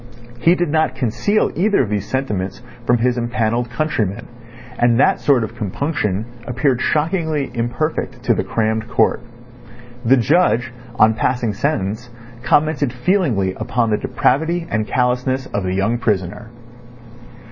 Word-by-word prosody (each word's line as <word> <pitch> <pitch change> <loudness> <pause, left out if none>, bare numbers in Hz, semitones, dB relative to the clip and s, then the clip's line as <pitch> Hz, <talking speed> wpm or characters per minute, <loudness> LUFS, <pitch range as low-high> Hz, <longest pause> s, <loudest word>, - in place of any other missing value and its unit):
He 170 +7 +4
did 175 -2 -1
not 155 -4 +1
conceal 130 - 0
either 200 -3 +2
of 110 - -4
these 105 -1 -2
sentiments 105 -7 -3 0.2
from 120 - +4
his 125 +1 +1
empanelled 120 0 -1
countrymen, 115 -5 -2 0.5
and 120 0 +3
that - - +4
sort 135 -5 +3
of 110 +1 -6
compunction 110 - -2 0.2
appeared 125 +1 0
shockingly 155 -3 0
imperfect 120 +6 -2
to - - +3
the - - -1
crammed 110 0 -1
court. - - +2 0.8
The 130 +3 +5
judge 125 -2 +2 0.2
on 110 0 +5
passing 120 -1 0
sentence 110 -2 -2 0.3
commented 145 +1 +2
feelingly 125 - +1
upon 115 +2 -1
the 105 - +2
depravity 160 +7 0
and 110 -1 0
callousness 125 +1 0
of 100 - 0
the 95 0 -2
young 110 +5 0
prisoner. 105 -1 -2
120 Hz, 135 wpm, -19 LUFS, 110-145 Hz, 0.8 s, The